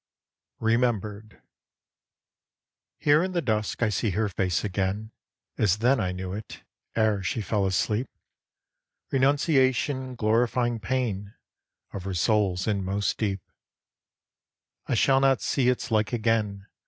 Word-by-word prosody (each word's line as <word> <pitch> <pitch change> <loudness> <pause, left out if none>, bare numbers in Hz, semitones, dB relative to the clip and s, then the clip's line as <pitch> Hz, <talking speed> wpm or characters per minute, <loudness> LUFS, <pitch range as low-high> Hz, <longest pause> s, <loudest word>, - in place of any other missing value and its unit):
REMEMBERED 110 -2 -1 1.5
Here 150 +3 +4
in 185 0 -3
the 175 - +1
dusk 110 -1 -1
I 115 - +3
see 105 +1 0
her 110 -1 +1
face 90 -2 -1
again 100 +2 -2 0.5
As 105 -2 +3
then 125 +5 +3
I 90 - 0
knew 90 0 -5
it, 105 +2 -8 0.3
ere 110 -3 +2
she 95 +5 -2
fell 105 -2 0
asleep; 105 +6 0 1.0
Renunciation 135 -1 +2
glorifying 120 +1 +1
pain 110 -4 -2 0.6
Of 95 -2 -6
her 95 -1 -3
soul's 95 -1 +1
inmost 100 -1 -1
deep. 100 -4 -1 1.5
I - - +1
shall 135 -1 +4
not 135 -1 +3
see 125 -3 +1
its 125 -2 -1
like 110 -1 +2
again! 110 -4 0
110 Hz, 120 wpm, -26 LUFS, 100-125 Hz, 1.5 s, Here